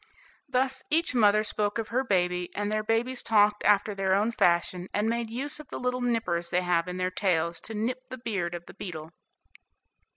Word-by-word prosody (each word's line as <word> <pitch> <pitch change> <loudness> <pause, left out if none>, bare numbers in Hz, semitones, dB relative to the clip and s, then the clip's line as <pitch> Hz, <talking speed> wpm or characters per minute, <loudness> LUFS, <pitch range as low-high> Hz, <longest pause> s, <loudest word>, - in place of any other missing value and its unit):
Thus 260 +1 +1
each 320 -2 +2
mother 215 -3 +4
spoke 210 0 +1
of 225 -1 -3
her 255 +3 +1
baby, 180 -5 0
and 205 0 -2
their 215 0 0
babies 235 +4 0
talked 210 -1 +3
after 210 0 +3
their 190 -1 +1
own 210 +4 +1
fashion, 175 -2 +1
and 210 +2 +1
made 235 0 -1
use 270 +6 -2
of 305 - -10
the - - -6
little 250 0 -1
nippers 200 -9 -1
they 180 - +1
have 175 -1 +1
in 180 0 -4
their 185 0 -1
tails 170 -3 0
to 220 - -6
nip 250 +4 -3
the 255 - -6
beard 200 -8 -3
of 175 0 -8
the - - -12
beetle. 160 -5 -7
210 Hz, 200 wpm, -27 LUFS, 180-235 Hz, -, mother